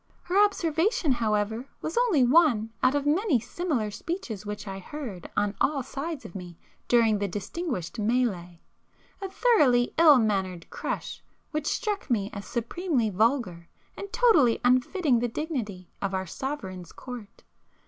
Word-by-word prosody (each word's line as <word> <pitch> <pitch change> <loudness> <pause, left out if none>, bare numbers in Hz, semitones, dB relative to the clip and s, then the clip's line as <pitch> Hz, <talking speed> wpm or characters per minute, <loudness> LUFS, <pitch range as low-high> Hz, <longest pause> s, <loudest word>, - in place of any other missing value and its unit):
Her 385 +4 +4
observation 345 - +1
however 220 0 0
was 315 - -4
only 455 - +3
one 245 -5 +4
out 255 +2 +3
of 285 -1 0
many 310 - +2
similar 245 -3 -2
speeches 225 - -5
which 210 0 -6
I 195 0 -5
heard 210 - -7
on 205 -1 +1
all 280 -3 +2
sides 285 +3 -5
of - - -9
me 180 -3 -8 0.3
during 225 -3 +4
the 200 - 0
'distinguished' 205 - -4
mélée,—a 210 - -4
thoroughly 285 - +3
ill 310 -4 +8
mannered 190 -6 -1
'crush,' - - -5 0.3
which 305 -1 -2
struck 420 -7 -2
me 210 -4 0
as 200 -1 -7
supremely 245 - -1
vulgar 200 -5 0 0.3
and 400 - -8
totally 310 - +4
unfitting 255 +2 +3
the 245 - 0
dignity 230 - -4
of 195 -1 -1
our 190 0 -2
Sovereign's 185 - -6
court. 240 -6 -10
245 Hz, 140 wpm, -27 LUFS, 205-310 Hz, 0.3 s, ill